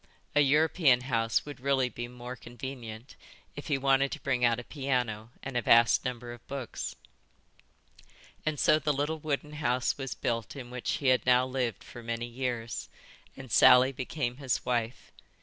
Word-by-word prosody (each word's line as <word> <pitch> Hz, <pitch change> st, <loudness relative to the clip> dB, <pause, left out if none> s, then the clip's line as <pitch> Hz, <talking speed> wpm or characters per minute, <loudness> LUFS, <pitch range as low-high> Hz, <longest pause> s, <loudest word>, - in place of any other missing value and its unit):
A -, -, +5 dB
European 150 Hz, -2 st, +4 dB
house 115 Hz, -3 st, 0 dB
would 145 Hz, -1 st, -8 dB
really 135 Hz, -1 st, +2 dB
be 120 Hz, -1 st, -6 dB
more 125 Hz, +1 st, -8 dB
convenient 120 Hz, -1 st, -8 dB, 0.4 s
if 145 Hz, -, -8 dB
he 145 Hz, -4 st, +1 dB
wanted 135 Hz, 0 st, +2 dB
to 155 Hz, -, -6 dB
bring 130 Hz, -2 st, -1 dB
out 120 Hz, -1 st, +3 dB
a -, -, -7 dB
piano 125 Hz, -6 st, -2 dB
and 135 Hz, -1 st, -6 dB
a 120 Hz, -, +2 dB
vast 115 Hz, 0 st, +5 dB
number 120 Hz, -1 st, -4 dB
of 120 Hz, -, -15 dB
books. 135 Hz, -3 st, -5 dB, 1.5 s
And 155 Hz, -2 st, -2 dB
so 155 Hz, -, +4 dB
the 150 Hz, 0 st, 0 dB
little 145 Hz, +3 st, -1 dB
wooden 150 Hz, 0 st, -3 dB
house 130 Hz, -3 st, 0 dB
was 135 Hz, -1 st, -4 dB
built 115 Hz, 0 st, -2 dB
in 125 Hz, -3 st, -8 dB
which 125 Hz, -1 st, -2 dB
he 135 Hz, -, +1 dB
had 125 Hz, -3 st, +3 dB
now 125 Hz, 0 st, +5 dB
lived 130 Hz, -3 st, -2 dB
for 120 Hz, -, -11 dB
many 115 Hz, 0 st, -3 dB
years, 120 Hz, -1 st, -4 dB, 0.5 s
and 130 Hz, -3 st, -10 dB
Sally 125 Hz, +4 st, +7 dB
became 130 Hz, -1 st, -3 dB
his 135 Hz, -3 st, -1 dB
wife. 120 Hz, -1 st, -2 dB
125 Hz, 170 wpm, -29 LUFS, 120-140 Hz, 1.5 s, Sally